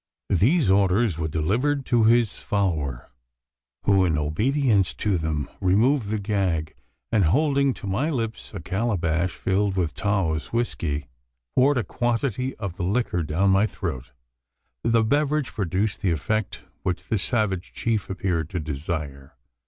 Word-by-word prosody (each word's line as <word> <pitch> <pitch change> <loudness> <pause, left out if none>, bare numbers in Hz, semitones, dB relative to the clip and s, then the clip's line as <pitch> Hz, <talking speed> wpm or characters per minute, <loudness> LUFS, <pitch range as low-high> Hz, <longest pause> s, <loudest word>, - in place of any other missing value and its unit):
These 120 - +3
orders 100 -1 +2
were 80 - -1
delivered 120 - 0
to 115 -2 +3
his 115 -1 +3
follower, 80 -11 -2 0.7
who, 100 -2 +4
in 80 -4 +1
obedience 105 - +1
to 100 -5 0
them, 80 -3 -2
removed 110 +6 +2
the 110 - 0
gag; 95 -7 -1 0.4
and, 105 -4 +3
holding 140 - +3
to - - -9
my 105 +11 0
lips 115 -7 -3
a - - -6
calabash 95 -4 -1
filled 100 0 0
with 85 -5 0
Taos 95 -7 -1
whiskey, 85 - -1 0.5
poured 140 +2 +4
a 120 - +1
quantity 125 +2 -1
of 100 -5 -6
the 90 - -3
liquor 95 -2 0
down 85 +6 +1
my 100 +3 +4
throat. 65 - -5 0.7
The 115 -1 +3
beverage 145 +3 +1
produced 100 +1 -1
the 95 - +1
effect 95 +7 -1 0.2
which 90 -1 -2
the 110 - -1
savage 100 -5 -1
chief 110 -3 -2
appeared 90 -5 -1
to 90 - -3
desire. 75 -1 -5
100 Hz, 145 wpm, -24 LUFS, 85-115 Hz, 0.7 s, who